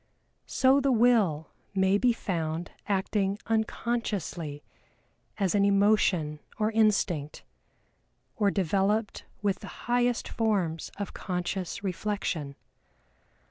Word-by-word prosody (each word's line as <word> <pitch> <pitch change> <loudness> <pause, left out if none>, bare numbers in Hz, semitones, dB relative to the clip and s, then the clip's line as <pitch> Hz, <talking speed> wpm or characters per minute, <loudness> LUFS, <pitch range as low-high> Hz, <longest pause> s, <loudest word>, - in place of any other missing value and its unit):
So 265 +1 +4
the 275 0 +2
Will 220 -10 +3 0.2
may 190 +1 +3
be 250 +1 +4
found 170 -6 -3 0.2
acting 195 0 0
unconsciously 215 -9 -2 0.7
as 195 -4 +1
an 205 -1 +3
emotion 200 -6 +3 0.2
or 215 0 +1
instinct, 200 -9 +1 0.9
or 205 -2 +2
developed 200 +3 0 0.2
with 200 -2 +1
the - - -10
highest 245 0 +1
forms 190 -8 -1
of 200 -2 -5
conscious 180 +1 -3
reflection. 180 -6 -2
200 Hz, 100 wpm, -28 LUFS, 175-220 Hz, 0.9 s, So